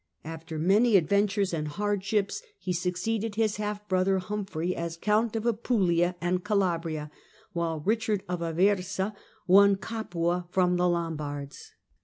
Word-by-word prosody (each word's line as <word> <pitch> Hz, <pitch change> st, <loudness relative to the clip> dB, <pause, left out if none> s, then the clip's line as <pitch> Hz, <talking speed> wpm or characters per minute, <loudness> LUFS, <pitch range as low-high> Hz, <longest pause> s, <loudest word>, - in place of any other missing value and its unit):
After 160 Hz, 0 st, -7 dB
many 200 Hz, +7 st, +4 dB
adventures 200 Hz, +2 st, +1 dB
and 155 Hz, -2 st, -2 dB
hardships, 205 Hz, +3 st, -1 dB, 0.2 s
he 185 Hz, -2 st, -3 dB
succeeded 195 Hz, +5 st, -2 dB
his 215 Hz, -2 st, +1 dB
half 210 Hz, 0 st, -4 dB
brother 190 Hz, 0 st, +2 dB
Humphrey 185 Hz, -3 st, -3 dB
as 170 Hz, 0 st, -4 dB
Count 215 Hz, +4 st, +1 dB
of 225 Hz, 0 st, -2 dB
Apulia 190 Hz, -7 st, +1 dB
and 180 Hz, +1 st, 0 dB
Calabria, 165 Hz, -7 st, -1 dB, 0.4 s
while 165 Hz, -2 st, -1 dB
Kichard 215 Hz, +3 st, 0 dB
of 180 Hz, -1 st, -2 dB
Aversa 190 Hz, +4 st, +1 dB, 0.3 s
won 200 Hz, +2 st, +6 dB
Capua 180 Hz, -5 st, -2 dB
from 180 Hz, -1 st, +2 dB
the 180 Hz, 0 st, +3 dB
Lombards. 150 Hz, -5 st, -4 dB
185 Hz, 130 wpm, -28 LUFS, 170-210 Hz, 0.4 s, won